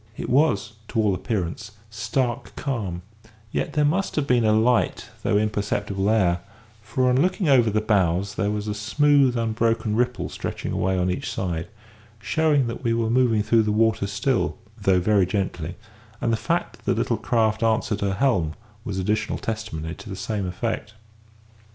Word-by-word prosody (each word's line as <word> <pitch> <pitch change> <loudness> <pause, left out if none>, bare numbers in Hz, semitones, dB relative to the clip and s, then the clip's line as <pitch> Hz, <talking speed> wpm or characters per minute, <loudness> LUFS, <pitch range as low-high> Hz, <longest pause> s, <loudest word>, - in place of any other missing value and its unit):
It - - -4
was, 115 -7 +2
to 115 - -2
all 105 -3 +3
appearance, 105 +1 -3 0.2
stark 120 +2 -2
calm; 105 -11 -3 0.5
yet - - -2
there 150 -1 +2
must 185 +7 0
have 150 - +1
been 125 -3 +3
a 110 - +4
light 115 +3 +2
though 105 - +2
imperceptible 105 -1 -1
air, 90 -6 +3 0.4
for 115 +5 0
on 125 +2 +3
looking 185 +1 +1
over 125 -5 +5
the 110 +1 +1
bows 95 -3 +1
there 100 +2 0
was 105 0 -3
a 105 - -1
smooth 130 +5 +3
unbroken 115 -1 0
ripple 125 +1 0
stretching - - -5
away 95 0 0
on 90 0 +1
each 90 - -3
side, 85 -2 -3 0.5
showing 150 +1 +2
that 115 +1 -5
we 115 -2 +1
were 115 -1 0
moving 120 -4 +3
through 110 +2 +4
the 105 -1 0
water 110 -1 +2
still, 105 +6 0 0.2
though 95 -2 +2
very 100 0 +3
gently; 90 -3 -2 0.4
and 115 - 0
the - - +4
fact 110 - -2
that - - -25
the - - +1
little - - +1
craft 110 -2 +1
answered 110 -2 +1
her 100 -1 0
helm 95 - +1 0.3
was 105 -6 -4
additional 105 +3 0
testimony 85 -8 -4
to 105 - -11
the 95 - -5
same 100 0 -3
effect. 110 +3 -3
110 Hz, 175 wpm, -24 LUFS, 100-120 Hz, 0.5 s, over